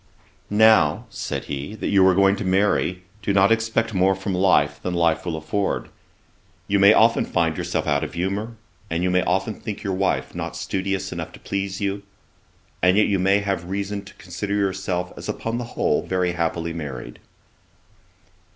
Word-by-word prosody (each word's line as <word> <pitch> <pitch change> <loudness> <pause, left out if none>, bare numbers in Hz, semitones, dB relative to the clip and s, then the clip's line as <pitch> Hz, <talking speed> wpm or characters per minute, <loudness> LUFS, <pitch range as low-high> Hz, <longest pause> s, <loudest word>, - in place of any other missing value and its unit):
'Now 105 -7 +4
(said - - -4
he,) 70 +8 -5
that - - -3
you 100 -2 +5
are 95 - +4
going 100 +1 +4
to - - -4
marry, 95 -1 +1 0.2
do 100 0 0
not 100 +2 +4
expect 115 0 +1
more 95 0 +3
from 95 0 -4
life, 90 -6 +2
than 90 -1 -3
life 85 0 +1
will 80 -2 -2
afford. 90 +6 -2 0.8
You 100 0 +2
may 100 +1 +8
often 115 +1 +4
find 85 -2 0
yourself - - -2
out 75 +1 +1
of 80 - -6
humour, 100 +6 -2 0.3
and 85 +2 -1
you 90 - +1
may 90 0 +3
often 95 +5 0
think 105 -1 -7
your 95 - -1
wife 75 -9 -1
not - - -5
studious 95 0 -2
enough - - -5
to - - -12
please 100 0 -3
you; 100 0 -1 0.8
and 90 +2 +4
yet 105 - +5
you 100 -2 +1
may 95 +2 +3
have 95 -3 -3
reason 100 +1 -3
to - - -14
consider 95 +3 -4
yourself 95 -3 -1
as - - -8
upon 115 +1 -3
the 120 - -4
whole - - +2
very 90 -1 0
happily 85 0 -2
married.' 65 -7 -7
95 Hz, 180 wpm, -23 LUFS, 85-100 Hz, 0.8 s, may